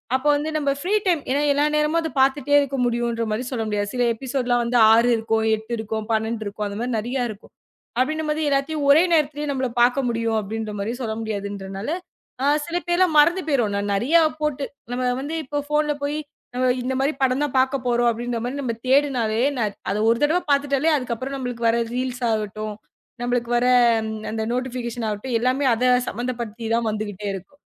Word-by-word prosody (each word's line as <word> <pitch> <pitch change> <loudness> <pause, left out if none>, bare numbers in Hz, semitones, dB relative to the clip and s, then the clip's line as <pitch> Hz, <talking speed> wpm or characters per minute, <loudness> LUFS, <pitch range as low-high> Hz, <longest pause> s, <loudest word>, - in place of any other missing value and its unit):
அப்ப 265 +2 -2
வந்து 295 +2 -2
நம்ம 285 -2 0
ஃப்ரீ 370 +7 0
டைம் 340 -5 +2
ஏன்னா 285 +2 +1
எல்லா 290 +1 +2
நேரமும் 300 +2 +2
அத 320 -1 -4
பாத்துட்டே 275 +1 +2
இருக்க 275 -1 -3
முடியும்னு 235 0 -1
சொல்ல 230 -4 -2
முடியாது. 205 -1 -1
சில 245 -1 +2
எபிசோட் 260 +1 -3
எல்லாம் 240 0 +1 0.2
6 230 +2 +4
இருக்கும், 220 0 0
8 220 +2 -7
இருக்கும், 220 0 -3
12 220 0 -1
இருக்கும். 205 +1 -4
அந்த 200 - -6
மாரி 245 +1 -2
நெறைய 245 +3 -2
இருக்கும். 210 0 -14 0.5
அப்படின்னும் 310 +4 0
போது 305 +1 0
எல்லாத்தையும் 285 +2 0
ஒரே 290 +3 +7
நேரத்துல 300 -1 +1
நம்ம 260 -1 -1
பாக்க 245 +3 +4
முடியும் 230 -1 0
அப்படின்னு 215 +1 -4
சொல்ல 220 -2 -2
முடியாது. 205 -2 -3 0.2
அதனால 195 +5 -5 0.8
சில 340 +1 -1
பேர்லாம் 345 -2 +3
மறந்து 335 +5 +4
போயிடுறோம். 240 -9 +1 0.2
நிறைய 245 +11 +1 0.3
போட்டு 295 -2 -1 0.3
நம்ம 250 +1 -1 0.2
வந்து 295 +4 -4
இப்போ 290 +3 -4
போன்ல 300 0 +2
போய் 290 +1 -2 0.6
இந்த 255 +2 -2
மாரி 275 +2 +2
படம் 260 0 +2
தான் 290 - -2
பாக்க 260 +1 +2
போறோம் 240 -1 +2
அப்படின்னு 235 +1 -2 0.2
நம்ம 255 -4 -2
தேடுனாலே, 255 -5 +2 0.5
அத 195 - 0
ஒரு 230 - +3
தடவை 320 +5 +3
பாத்துட்டாலே, 280 +1 +2
அதுக்கப்புறம் 255 0 -3
நமக்கு 245 -3 -4
வர 230 +1 +3 0.2
ரீல்ஸ் 255 0 -3
ஆகட்டும், 215 -1 -2 0.5
நமக்கு 245 -1 -1
வர 240 - +1 0.7
அந்த 220 0 -2
நோட்டிபிகேஷன் 245 -2 -3
ஆகட்டும் 220 +4 -2
எல்லாமே 255 +3 +1
அத 250 +3 +2 0.2
சம்பந்தப்படுத்தி 235 -1 -4
தான் 230 -1 0
வந்துகிட்டே 210 -1 -4
இருக்கும். 240 +10 -10
245 Hz, 170 wpm, -23 LUFS, 225-280 Hz, 0.8 s, ஒரே